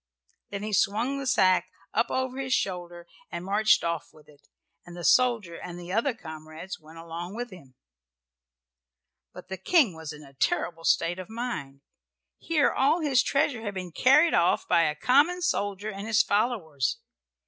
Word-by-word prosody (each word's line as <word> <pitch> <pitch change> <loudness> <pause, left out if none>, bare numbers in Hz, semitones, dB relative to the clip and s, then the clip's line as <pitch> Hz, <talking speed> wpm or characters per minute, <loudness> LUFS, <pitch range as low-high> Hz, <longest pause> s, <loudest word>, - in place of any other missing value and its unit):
Then 200 0 -5
he 215 0 -4
swung 230 +8 +1
the 275 - -4
sack 185 -6 +3 0.2
up 230 - +1
over 260 0 -2
his 260 -1 +1
shoulder 175 -2 -4 0.3
and 170 +1 -5
marched 210 +3 +3
off 170 -2 -3
with 155 -1 -20
it, 145 -1 -21 0.4
and 175 0 -11
the 175 - -7
soldier 230 -5 +3
and 175 0 -8
the 175 +1 -7
other 230 +4 +1
comrades 160 -1 -9
went 160 +1 -15
along 170 +3 -7
with 240 0 -5
him. 140 -9 -14 1.6
But - - -12
the 190 - -5
King 260 - +3
was 160 -2 -7
in 150 0 -11
a 140 -1 -16
terrible 165 +5 -1
state 175 +2 +2
of 185 - -8
mind. 185 - -5 0.6
Here 315 -4 +2
all 300 +6 +2
his 275 -5 +3
treasure 275 -4 0
had 205 -3 -5
been 185 -2 -5
carried 285 - +5
off 170 +1 +2
by 170 - +4
a 150 - 0
common 290 - +3
soldier 205 - -1
and 200 +2 -7
his 225 0 +4
followers. 200 - 0
190 Hz, 170 wpm, -27 LUFS, 170-245 Hz, 1.6 s, carried